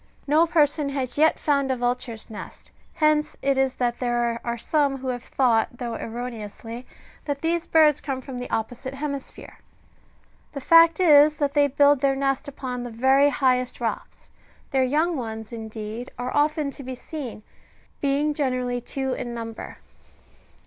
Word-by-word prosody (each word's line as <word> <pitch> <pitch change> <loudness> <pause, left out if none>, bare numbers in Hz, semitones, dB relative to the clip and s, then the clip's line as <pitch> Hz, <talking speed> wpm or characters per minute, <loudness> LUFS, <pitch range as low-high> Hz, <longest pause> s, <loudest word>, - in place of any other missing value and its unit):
No 310 +4 +4
person 300 -3 +2
has 265 -3 -3
yet 315 +2 +4
found 280 -2 +1
a 260 - +1
vulture's 245 -2 -3
nest: 215 - -9 0.2
hence 305 -1 +2
it 275 0 +2
is 265 -1 +1
that 240 -1 -1
there 240 -1 0
are 235 0 -2
some 280 +2 +1
who 260 0 -5
have 245 -1 -3
thought, 240 -2 +1
though 240 -1 -4
erroneously, 230 0 -7 0.4
that 285 -1 -3
these 335 +1 0
birds 305 -3 +4
come 270 -3 -3
from 260 -1 -7
the 250 - -6
opposite 245 +4 -4
heraisphere.^^ 280 -1 -6 1.0
The 280 - -4
fact 330 +4 +6
is, 300 -3 +6
that 285 -1 -1
they 290 -1 +4
build 285 0 +4
their 275 -1 +2
nest 275 0 -1
upon 255 -3 -5
the 245 - -5
very 265 +5 +4
highest 255 -3 +1
rocks; 230 -2 -5 0.4
their 265 -1 +3
young 310 +6 +1
ones, 220 -2 -6
indeed, 220 +1 -6
are 245 +1 -4
often 295 0 +1
to 280 - -10
be 260 0 -6
seen, 255 -5 -7 0.6
being 285 +2 +1
generally 255 -4 -1
two 265 +2 -3
in 240 -2 -5
number. 225 -1 -7
265 Hz, 160 wpm, -24 LUFS, 245-290 Hz, 1.0 s, fact